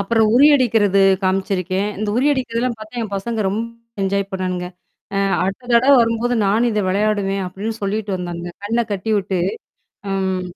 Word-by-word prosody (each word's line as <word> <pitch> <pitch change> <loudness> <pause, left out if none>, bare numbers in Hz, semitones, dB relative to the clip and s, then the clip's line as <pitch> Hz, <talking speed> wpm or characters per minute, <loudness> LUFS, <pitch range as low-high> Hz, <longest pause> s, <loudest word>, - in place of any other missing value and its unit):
அப்புறம் 220 +2 +2
உறியடிக்கிறது 240 -8 +4 0.2
காமிச்சிருக்கேன். 190 0 0
இந்த 215 0 -2
உறியடிக்கிறதெல்லாம் 250 -3 0
பாத்தா 215 +3 -8
என் 205 -3 -5
பசங்க 220 +2 -2
ரொம்ப 205 +4 -1 0.4
என்ஜாய் 195 0 0
பண்ணானுங்க. 185 -1 -2 0.5
"அ - - +1 0.3
அடுத்த 195 +6 -4
தடவ 255 +4 +5
வரும்போது 230 +1 +1
நானும் 220 +5 +2
இத 210 -1 0
விளையாடுவேன்." 200 0 0
அப்படின்னு 205 +5 -4
சொல்லிட்டு 205 0 -2
வந்தானுங்க. 175 -1 -6
கண்ண 230 +3 0
கட்டிவிட்டு 200 -2 -1 0.7
அம் 190 -1 -1
205 Hz, 135 wpm, -19 LUFS, 190-230 Hz, 0.7 s, தடவ